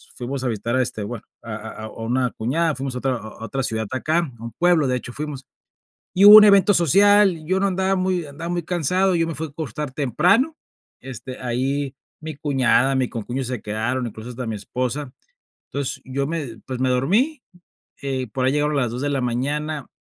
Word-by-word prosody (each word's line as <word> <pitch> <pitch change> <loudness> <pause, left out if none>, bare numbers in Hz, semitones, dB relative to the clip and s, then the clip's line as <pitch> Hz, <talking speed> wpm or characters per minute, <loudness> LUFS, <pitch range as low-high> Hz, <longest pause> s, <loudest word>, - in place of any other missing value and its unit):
fuimos 130 +2 -4
a 130 - 0
visitar, 115 +2 -2
a 130 - +3
este, 110 - -4
bueno, 105 +2 -6 0.2
a 110 -2 -6
a 110 +1 -7
a - - -7
una 125 +4 -1
cuñada, 155 +7 0
fuimos 135 0 -3
a - - -4
otra 135 0 0
a - - -3
a 110 0 -10
otra 135 +4 -3
ciudad 110 -3 -1
acá, 155 +6 +1 0.2
a - - -11
un 115 - -6
pueblo, 175 -3 +4
de 125 -1 +1
hecho 125 - -8
fuimos, 145 -1 -6 0.7
y 195 +2 +5
hubo 205 +1 +12
un 215 - +11
evento 200 0 +6
social, 195 0 +4
yo 185 +4 +1
no 200 - +3
andaba 190 0 +1
muy 185 -2 0
andaba 150 +4 -7
muy 175 0 -2
cansado, 180 +3 +1
yo 165 -1 +2
me 165 -1 -4
fui 160 - -3
a - - -14
acostar 150 -1 -5
temprano, 180 - +2 0.4
este, 130 0 -8
ahí 135 +3 -2 0.2
mi 155 -1 -7
cuñada, 135 -2 +2
mi 130 -1 +1
concuño 120 +4 -4
se 125 -3 -4
quedaron, 110 +4 -2
incluso 110 +1 -9
hasta 125 0 -6
mi 110 - -2
esposa, 125 +6 -3 0.5
entonces, 140 -2 -4
yo 135 +1 -2
me 145 -7 -4
pues, 130 -2 -5
me 130 - +1
dormí, 210 - +1 0.6
eh, 130 -2 -2
por 130 0 -1
ahí 130 - +3
llegaron 150 +1 +1
las 125 -5 0
2 125 +2 -4
de 145 - 0
la 140 -2 0
mañana, 145 +4 -2
135 Hz, 210 wpm, -22 LUFS, 125-165 Hz, 0.7 s, hubo